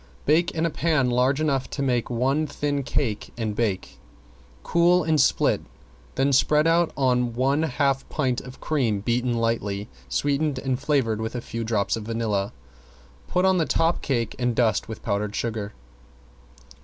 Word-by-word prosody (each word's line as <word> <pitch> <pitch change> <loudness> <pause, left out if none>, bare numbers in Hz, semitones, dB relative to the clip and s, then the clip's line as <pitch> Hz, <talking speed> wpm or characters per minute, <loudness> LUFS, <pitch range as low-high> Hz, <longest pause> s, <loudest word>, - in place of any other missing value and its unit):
Bake 165 +4 +3
in 165 0 -1
a 165 - 0
pan 150 -7 +1
large 130 +3 +2
enough 140 -4 0
to 140 - -3
make 125 -3 0
one 135 +6 +1
thin 145 0 -2
cake 130 -5 -2
and 110 -3 -2
bake. 105 -5 -2 0.6
Cool 175 +1 +3
and 155 -1 +3
split, - - +2 0.5
then 135 +1 +2
spread 150 +4 +4
on 130 -8 +2
one 135 +4 +2
half 140 -2 0
pint 130 -5 -1
of 125 0 -11
cream 120 -10 0
beaten 120 +2 0
light, 115 0 +1 0.5
sweetened, 140 - 0
and 130 -1 -2
flavored 130 -7 0
with 110 +2 -4
a - - -1
few 115 0 -5
drops 110 -2 0
of 110 -2 -6
vanilla. 110 -3 -1 0.8
Put 180 +1 +1
on 190 -1 +3
the 160 - +1
top 165 +1 +1
cake 115 -6 -1
and 120 -1 0
dust 115 -3 +1
with 110 - -8
powdered 105 +1 -2
sugar. 110 -3 -3
130 Hz, 160 wpm, -24 LUFS, 115-150 Hz, 0.8 s, spread